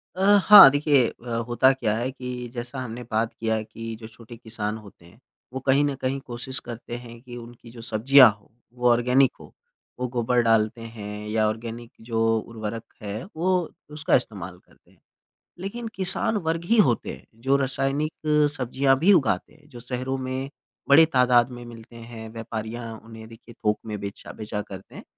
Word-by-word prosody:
अ, 190 - -4 0.2
हाँ, 205 -6 +11
देखिए 145 -4 +3
अ, 120 - -12 0.2
होता 125 +2 +4
क्या 110 -5 -1
है 125 +3 -2
कि 125 -1 -6
जैसा 120 +2 -5
हमने 125 -1 -6
बात 110 +1 0
किया 110 -1 -1
कि 115 +1 -8
जो 110 - -9
छोटे 115 +1 -13
किसान 110 -2 -4
होते 100 -5 -16
हैं, 95 +7 -19 0.3
वो 130 - -3
कहीं 140 +2 +4
न 140 -1 -1
कहीं 130 +1 -1
कोशिश 125 +2 -5
करते 120 0 -7
हैं 120 -1 -11
कि 120 -1 -10
उनकी 120 0 -12
जो 115 -1 -11
सब्ज़ियाँ 125 +3 +6
हों, - - -26 0.3
वो 125 0 +1
ऑर्गेनिक 125 +3 +3
हों। - - -13 0.5
वो 125 - -1
गोबर 120 0 +1
डालते 115 0 +1
हैं 105 -2 -8
या 110 0 +1
ऑर्गेनिक 115 +2 -5
जो 115 -1 -1 0.2
उर्वरक 110 0 -6 0.2
है, 105 +3 -5
वो 180 0 0 0.2
उसका 150 0 +1
इस्तेमाल 95 -7 -3
करते - - -27
हैं। - - -28 0.6
लेकिन 225 +4 -5
किसान 190 +3 +2
वर्ग 165 +1 -1
ही 230 +5 +2
होते 115 - -3
हैं, - - -16
जो 135 +5 +1
रासायनिक 135 +3 -1 0.4
सब्ज़ियाँ 135 +1 +1
भी 190 +7 +5
उगाते 145 - +1
हैं, 150 -1 -23
जो 120 -4 -11
शहरों 130 +2 -3
में 130 +1 -4 0.4
बड़े 160 +3 +7
तादाद 125 -1 +4
में 120 -1 -9
मिलते 115 0 -12
हैं, 115 -1 -9
व्यापारियाँ 115 0 -6
उन्हें 110 -1 -11
देखिए 115 0 -15
थोक 105 0 +2
में 105 -1 -4
बेचा 100 0 -8
बेचा 105 -1 -5
करते 95 -1 -12
हैं। - - -10
120 Hz, 180 wpm, -24 LUFS, 110-130 Hz, 0.6 s, हाँ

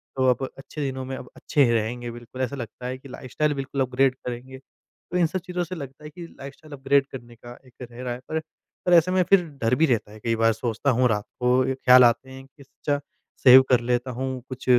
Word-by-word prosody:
तो 130 -1 +1
अब 125 +1 0
अच्छे 145 +2 -8
दिनों 130 -1 -3
में 130 +1 -5
अब 125 - -10
अच्छे 145 -2 +2
रहेंगे 120 +2 -2
बिल्कुल, 120 +2 -9
ऐसा 130 +1 -2
लगता 120 -1 -8
है 130 +1 -4
कि 135 +1 -14
लाइफ़स्टाइल 145 +4 -2
बिल्कुल 135 0 -3
अपग्रेड 130 0 +2
करेंगे। 125 +2 -6 0.5
तो 180 - 0
इन 175 - +4
सब 185 +4 -3
चीज़ों 180 -1 -2
से 175 +2 -6
लगता 140 -2 -9
है 150 - -8
कि 175 +2 -10
लाइफ़स्टाइल 140 +1 -12
अपग्रेड 140 0 +2
करने 120 -2 -10
का 120 +1 -12
एक 130 - -20 0.2
रह 120 +1 -10
रहा 125 -1 -2
है 120 - -7 0.7
पर 180 - +4
ऐसे 170 +2 +4
में 185 0 +3
फिर 195 -2 +6 0.2
डर 115 +2 +2
भी 160 - +3
रहता 115 -7 0
है। 110 - -12
कई 115 +1 -1
बार 115 0 +3
सोचता 115 +4 -2
हूँ 125 +1 +3
रात 105 -2 -1
को 125 +1 +3
ख्याल 125 -1 +7
आते 120 +2 +2
हैं 135 0 -11
कि 135 - -27
इससे 140 +2 -6
अच्छा 145 - -1 0.4
सेव 130 0 +10
कर 125 - +5
लेता 125 +1 -1
हूँ, 130 +1 -4
कुछ 130 -1 -8
130 Hz, 235 wpm, -24 LUFS, 120-140 Hz, 0.7 s, सेव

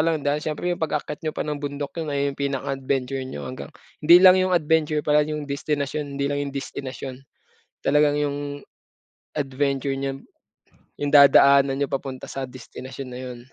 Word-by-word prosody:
lang 160 -2 +1
dahil 145 +1 +1
siyempre 155 +3 -3
'yung 175 - -5
pag-akyat 150 -1 -2
niyo 155 -1 -3
pa - - -1
ng 150 -2 -4
bundok 145 0 -4
'yun 160 - -4
nga 145 - -2
'yung 140 0 -1
pinaka 140 -2 -2
adventure 135 0 -2
niyo 130 - -7
hanggang 130 +1 -7 0.3
hindi 165 +3 +8
lang 185 -1 +9
'yung 185 0 +1
adventure 155 -2 +2
pala, 150 0 +4
'yung 150 -1 -4
destinasyon, 145 0 -3
hindi 140 - -1
lang 145 - -1
'yung 140 -1 -4
destinasyon, 135 -1 -6 0.7
talagang 145 0 +3
'yung 145 -1 -1 1.0
adventure 140 -1 -1
niyo, 135 0 -3 0.8
'yung 145 0 -2
dadaanan 140 -1 +7
niyo 140 +1 -1
papunta 135 -1 -5
sa 135 -1 -4
destinasyon 130 +1 -9
na 125 - -7
'yun. 125 -1 -7
140 Hz, 175 wpm, -24 LUFS, 135-150 Hz, 1.0 s, lang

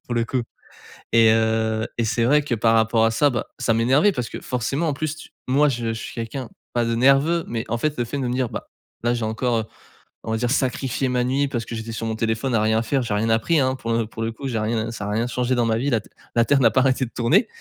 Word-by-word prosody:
pour 120 - -4
le 115 -1 +1
coup 125 +1 -1 0.7
et 115 -1 +6
heu 110 0 +1
et 115 - +1
c'est 115 +1 +1
vrai 150 +5 +4
que 140 -4 -1
par 115 0 +2
rapport 110 0 +3
à 115 - +3
ça, 115 +6 +3
bah, 120 -3 -3
ça 115 - +1
m'énervait. 130 - +4
Parce 125 -6 -4
que - - -6
forcément, 135 +6 -2
en 145 - 0
plus 155 +1 -3
tu 155 - -12 0.2
moi 145 +3 +4
je 120 -3 -2
je - - 0
suis - - -7
quelqu'un 115 +2 -5 0.2
pas 120 -1 +1
de 115 - 0
nerveux 140 +7 +3
mais 115 -1 -3
en 120 - 0
fait, 150 +3 -1
le 120 - +1
fait 145 - -5
de 130 - -1
me 120 - -1
dire: 125 -1 0
«Bah, - - -6 0.4
là 120 - +3
j'ai 120 -2 -2
encore, 115 +2 0
heu, 110 - -1 0.6
on 110 - -4
va 110 - 0
dire 120 +1 -1
sacrifié 130 -1 0
ma 125 -1 +1
nuit 135 +3 +1
parce 120 -4 -3
que - - -8
j'étais 110 0 -5
sur 115 0 -4
mon 110 0 -2
téléphone, 115 +3 -1
à 110 - +3
rien 110 +1 +2
faire, 135 +4 0
j'ai 115 -4 -2
rien 110 +2 0
appris, 150 +9 +2
hein, 130 -1 +1
pour 115 -3 -4
le 115 -1 +1
pour 115 - -8
le 115 - -1
coup, 135 +5 -6
j'ai 120 -4 -1
rien 110 +1 -1
ça 105 -3 -6
a - - -3
rien 110 +3 0
changé 125 +1 0
dans 120 -1 +2
ma 110 -1 +1
vie, 140 +4 0
la 120 -4 +2
te - - -20 0.3
la 115 -1 +4
terre 140 +1 +3
n'a 115 -4 +5
pas 130 - +3
arrêté 130 0 +2
de 120 - -12
tourner» 145 - +3
120 Hz, 290 wpm, -22 LUFS, 115-130 Hz, 0.7 s, et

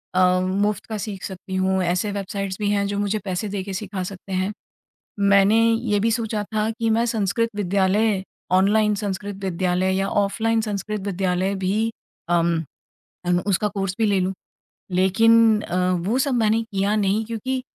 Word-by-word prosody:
अ, 185 0 +4
मुफ्त 195 +2 0
का 220 - -4
सीख 200 -2 -6
सकती 190 0 -6
हूँ, 190 0 +1
ऐसे 180 +4 0
वेबसाइटस 195 -1 -4
भी 205 -1 0
हैं 200 -1 +1
जो 200 - -3
मुझे 205 +1 0
पैसे 185 +2 -2
देके 195 -1 -4
सिखा 190 -1 -4
सकते 190 +1 -8
हैं 185 +2 0 0.7
मैंने 200 +1 +5 0.2
ये 225 -2 +1
भी 225 +3 +2
सोचा 220 -2 -1
था 215 0 +1
कि 225 0 -2
मैं 225 +1 +2
संस्कृत 225 0 0
विद्यालय 200 +1 +1 0.3
ऑनलाइन 210 +3 +4
संस्कृत 200 -1 -4
विद्यालय 185 0 0
या 195 +1 0
ऑफलाइन 225 +3 +1
संस्कृत 210 -1 -3
विद्यालय 190 0 0
भी, 215 +4 +1 0.4
अम, 170 -1 +2 0.6
अम, 175 0 +2
उसका 200 +1 +2
कोर्स 195 -2 -3
भी 225 - +3
ले 200 -2 +2
लूँ। 185 +1 0 0.6
लेकिन 220 +4 +4
अ, 180 - -4 0.3
वो 235 +5 +1
सब 270 -1 +1
मैंने 225 -1 +2
किया 200 -2 -1
नहीं, 205 +1 +1
क्योंकि 255 +4 -3
200 Hz, 165 wpm, -23 LUFS, 190-215 Hz, 0.7 s, मैंने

